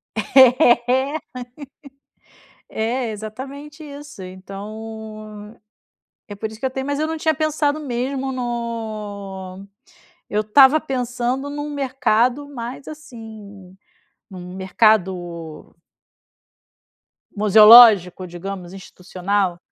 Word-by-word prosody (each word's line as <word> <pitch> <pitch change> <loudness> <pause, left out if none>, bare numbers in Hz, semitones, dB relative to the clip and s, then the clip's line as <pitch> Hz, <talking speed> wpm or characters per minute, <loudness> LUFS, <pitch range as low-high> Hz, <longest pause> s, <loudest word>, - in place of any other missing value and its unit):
É, 255 +3 +4 1.9
é 220 - -4
exatamente 270 +8 -9
isso 290 -5 -11
então 215 +3 -9 0.7
é 205 - -7
por 215 +2 -5
isso 220 - -12
que - - -7
eu - - -1
tenho 265 +1 -5
mas 285 0 -2
eu 310 - 0
não 320 0 -4
tinha 315 0 +1
pensado 305 0 -1
mesmo 265 0 -3
no 215 -6 -6 0.6
eu 210 - 0
estava 265 +8 +5
pensando 250 0 -3
num 290 +1 -5
mercado 270 0 0
mais, 250 0 -8
assim, 220 -10 -12 0.6
num 180 -1 -9
mercado 180 -5 -1 1.6
museológico 210 -3 +7
digamos, 180 +1 -8
institucional, 185 0 -3
225 Hz, 90 wpm, -20 LUFS, 200-270 Hz, 1.9 s, museológico